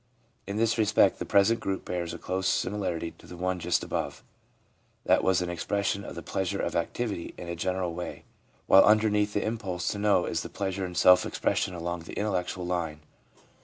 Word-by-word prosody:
In 100 Hz, +1 st, -3 dB
this 115 Hz, +1 st, +1 dB
respect 105 Hz, -1 st, +4 dB
the -, -, -4 dB
present 105 Hz, +4 st, +4 dB
group 95 Hz, -1 st, -3 dB
bears 85 Hz, -2 st, -3 dB
a -, -, -6 dB
close 95 Hz, +1 st, -2 dB
similarity 90 Hz, -4 st, -1 dB
to -, -, -15 dB
the 90 Hz, -, -10 dB
one 90 Hz, +1 st, -1 dB
just -, -, 0 dB
above. -, -, -4 dB, 0.8 s
That -, -, +4 dB
was 95 Hz, -1 st, +3 dB
an 90 Hz, -, -3 dB
expression 100 Hz, +3 st, -1 dB
of -, -, -8 dB
the -, -, -7 dB
pleasure -, -, -2 dB
of -, -, -2 dB
activity 110 Hz, -8 st, -2 dB
in 90 Hz, -, -8 dB
a 85 Hz, -, -3 dB
general 90 Hz, 0 st, -1 dB
way, 90 Hz, +1 st, -6 dB, 0.4 s
while 95 Hz, -, +8 dB
underneath 105 Hz, -1 st, +3 dB
the 105 Hz, -, 0 dB
impulse 105 Hz, -5 st, -2 dB
to 100 Hz, -, -3 dB
know 100 Hz, -3 st, +3 dB
is 85 Hz, -, -1 dB
the -, -, -7 dB
pleasure 95 Hz, -1 st, -3 dB
in 90 Hz, -, -9 dB
self 90 Hz, +1 st, +6 dB
expression 90 Hz, -, -1 dB
along 85 Hz, 0 st, -3 dB
the 85 Hz, -, -9 dB
intellectual 90 Hz, -3 st, -2 dB
line. 85 Hz, -4 st, -2 dB
95 Hz, 195 wpm, -28 LUFS, 90-105 Hz, 0.8 s, while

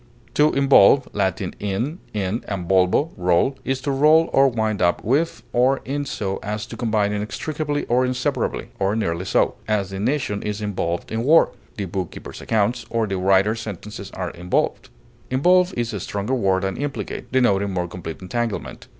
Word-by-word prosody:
To 150 Hz, +1 st, +4 dB
involve 135 Hz, -1 st, +5 dB
(L. 95 Hz, -2 st, +2 dB
in, 95 Hz, -3 st, -4 dB
in, 115 Hz, -, -2 dB, 0.5 s
and 95 Hz, -4 st, -4 dB
volvo, 95 Hz, -, +3 dB
roll) 90 Hz, +9 st, +1 dB
is 135 Hz, 0 st, -1 dB
to 140 Hz, -, -1 dB
roll 155 Hz, +4 st, +4 dB
or 135 Hz, 0 st, +6 dB
wind 110 Hz, -5 st, -1 dB
up 85 Hz, -1 st, +2 dB
with 145 Hz, +9 st, 0 dB
or 130 Hz, +3 st, +3 dB
in 145 Hz, +1 st, -2 dB
so 95 Hz, -6 st, -3 dB
as 105 Hz, +1 st, -4 dB
to -, -, -9 dB
combine 105 Hz, -4 st, 0 dB
inextricably 145 Hz, +8 st, -3 dB
or 125 Hz, +2 st, +2 dB
inseparably, 125 Hz, 0 st, -1 dB
or 100 Hz, +1 st, +1 dB
nearly 90 Hz, -5 st, -1 dB
so; -, -, +2 dB
as, 100 Hz, -3 st, 0 dB
the 95 Hz, -, -5 dB
nation 120 Hz, -3 st, -1 dB
is 105 Hz, 0 st, -3 dB
involved 90 Hz, -5 st, -3 dB
in 110 Hz, +1 st, -1 dB
war; 160 Hz, +5 st, +5 dB, 0.3 s
the 100 Hz, -, -2 dB
bookkeeper's 90 Hz, -1 st, -6 dB
accounts, 115 Hz, +2 st, 0 dB
or 115 Hz, -1 st, 0 dB
the 95 Hz, -2 st, -2 dB
writer's 100 Hz, +4 st, +3 dB
sentences 105 Hz, -1 st, -7 dB
are 90 Hz, -2 st, -3 dB
involved. 90 Hz, +1 st, -1 dB, 0.4 s
Involve 180 Hz, +8 st, +4 dB
is 120 Hz, -1 st, -1 dB
a 100 Hz, -, -3 dB
stronger 100 Hz, +6 st, -3 dB
word 95 Hz, -6 st, +1 dB
than 95 Hz, 0 st, -2 dB
implicate, 145 Hz, 0 st, -5 dB
denoting 100 Hz, -6 st, +2 dB
more 90 Hz, -2 st, -2 dB
complete 85 Hz, 0 st, -8 dB
entanglement. 115 Hz, +3 st, -3 dB
105 Hz, 170 wpm, -22 LUFS, 95-130 Hz, 0.5 s, or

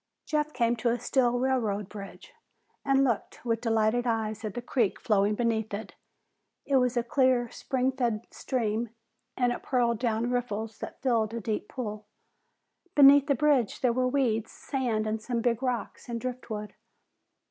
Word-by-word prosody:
Jeff 300 Hz, 0 st, 0 dB
came 240 Hz, -3 st, +1 dB
to 235 Hz, +1 st, 0 dB
a 235 Hz, -, +1 dB
steel 245 Hz, 0 st, +1 dB
railroad 230 Hz, -6 st, 0 dB
bridge 205 Hz, -, -10 dB, 0.5 s
and 275 Hz, -1 st, +3 dB
looked 240 Hz, -1 st, -2 dB
with 230 Hz, -1 st, 0 dB
delighted 225 Hz, +1 st, +1 dB
eyes 220 Hz, -1 st, -1 dB
at 215 Hz, -2 st, -4 dB
the -, -, -2 dB
creek 235 Hz, -5 st, 0 dB
flowing 210 Hz, -1 st, +2 dB
beneath 225 Hz, -1 st, 0 dB
it. 215 Hz, -, -7 dB, 0.7 s
It 275 Hz, -, +3 dB
was 250 Hz, -1 st, +2 dB
a 240 Hz, -, +2 dB
clear, 250 Hz, -1 st, +2 dB
spring 260 Hz, 0 st, -1 dB
fed 235 Hz, -4 st, -1 dB
stream, 230 Hz, -2 st, -2 dB, 0.5 s
and 245 Hz, -1 st, +2 dB
it -, -, -6 dB
purled 235 Hz, -3 st, +1 dB
down 235 Hz, 0 st, 0 dB
riffles 225 Hz, -3 st, -2 dB
that -, -, -8 dB
filled 230 Hz, -4 st, +1 dB
a -, -, -2 dB
deep 215 Hz, -1 st, -3 dB
pool. 215 Hz, -4 st, -5 dB, 0.9 s
Beneath 280 Hz, 0 st, +8 dB
the 280 Hz, -, +3 dB
bridge 280 Hz, -3 st, +2 dB
there 250 Hz, -3 st, +3 dB
were 255 Hz, +1 st, +1 dB
weeds, 240 Hz, -5 st, 0 dB
sand, 220 Hz, -5 st, -2 dB
some 235 Hz, +1 st, -2 dB
big 235 Hz, 0 st, +1 dB
rocks, 250 Hz, -1 st, -3 dB
and 235 Hz, -1 st, -2 dB
driftwood. 230 Hz, -4 st, -5 dB
235 Hz, 160 wpm, -28 LUFS, 220-255 Hz, 0.9 s, Beneath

